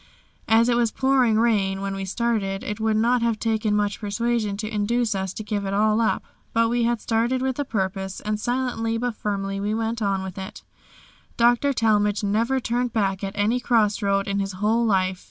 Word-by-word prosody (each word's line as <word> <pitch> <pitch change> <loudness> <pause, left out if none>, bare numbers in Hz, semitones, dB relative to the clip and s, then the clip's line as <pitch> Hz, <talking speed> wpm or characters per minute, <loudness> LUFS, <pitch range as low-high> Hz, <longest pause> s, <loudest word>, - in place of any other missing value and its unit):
As 225 +1 +4
it 245 - +3
was 235 -1 +2
pouring 260 -4 +2
rain 205 -4 +2
when 195 0 -3
we 195 0 -4
started, 195 -2 -1
it 210 +1 -4
would 220 0 +1
not 240 +2 +2
have 230 -2 +1
taken 220 -1 0
much 205 -1 0
persuasion 215 0 -1
to 215 +1 -4
induce 220 +2 0
us 190 -1 -2
to 215 - -5
give 205 -1 -2
it 195 0 -2
all 215 +2 +3
up. 225 - +1 0.3
But 230 0 +3
we 240 0 +1
had 235 -1 +1
started 235 +4 0
with 265 0 -1
a 285 - 0
purpose, 190 -3 -3
and 210 0 -3
silently 240 -1 -1
but 245 +1 -2
firmly 195 -2 -3
we 205 +2 -1
went 225 +1 -2
on 195 -2 0
with 190 0 -7
it. 190 +1 -8 0.7
Dr. 240 +4 +3
Talmage 210 -4 +1
never 230 +6 +1
turned 245 -1 -1
back 195 -3 0
at 195 0 -3
any 215 +5 +2
cross 220 -4 +2
road 200 -1 +1
in 200 0 -1
his 195 0 -2
whole 215 +5 +1
life. 185 -4 +1
215 Hz, 205 wpm, -24 LUFS, 200-235 Hz, 0.7 s, As